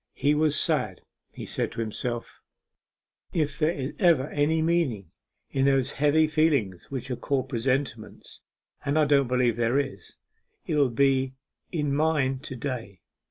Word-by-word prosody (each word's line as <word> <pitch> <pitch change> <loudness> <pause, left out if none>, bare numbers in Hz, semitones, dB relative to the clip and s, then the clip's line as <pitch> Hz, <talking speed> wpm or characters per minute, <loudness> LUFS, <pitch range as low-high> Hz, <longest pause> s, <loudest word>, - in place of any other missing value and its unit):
He 145 - +2
was 150 0 +2
sad; - - 0 0.3
he - - -8
said - - -2
to - - -7
himself 115 +2 -4 0.9
'If 150 -4 -1
there 155 0 +3
is 140 -5 -3
ever 160 -7 +3
any 150 +2 +1
meaning 155 - 0 0.4
in 135 0 +1
those 135 -1 +2
heavy 150 +2 +3
feelings 150 - +1
which 130 -1 -5
are - - 0
called 135 +1 -2
presentiments 130 +4 -3 0.4
and 145 +1 0
I 155 - +5
don't 140 -2 +3
believe 125 -2 +1
there 120 +2 +2
is 135 -10 -4 0.5
there 155 - -1
will 140 -3 +4
be 130 +1 +2 0.4
in 150 -5 -1
mine 140 -3 +1
to 135 -1 -7
day.... 115 - -5
140 Hz, 155 wpm, -26 LUFS, 125-150 Hz, 0.9 s, I